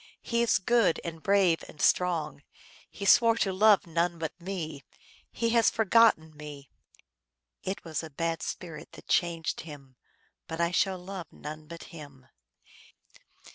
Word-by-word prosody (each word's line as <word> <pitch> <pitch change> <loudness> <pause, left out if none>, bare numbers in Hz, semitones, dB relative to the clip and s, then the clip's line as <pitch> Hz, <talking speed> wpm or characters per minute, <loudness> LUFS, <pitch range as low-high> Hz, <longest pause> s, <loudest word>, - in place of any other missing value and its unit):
He 235 0 0
is 235 - +3
good 200 -2 +2
and 165 -2 -6
brave 195 -4 +3
and 150 - -14
strong. 155 -6 +1 0.5
He 200 - -7
swore 230 +3 +6
to 195 -4 0
love 205 +1 +5
none 170 +1 0
but 160 -1 -4
me; 165 -6 -5 0.5
He 230 - -1
has 230 -1 +5
forgotten 220 -8 +3
me. 145 -2 -10 0.9
It 190 +1 -4
was 160 -3 -3
a 160 - -8
bad 165 +3 -2
spirit 165 -4 -7
that - - -14
changed 170 -2 0
him, 140 -5 -12 0.5
But 165 - -6
I 170 +1 +1
will 190 -1 -4
love 180 -1 -7
none 155 +1 -9
but 170 +1 -9
him." 145 -5 -12
170 Hz, 145 wpm, -28 LUFS, 155-195 Hz, 0.9 s, swore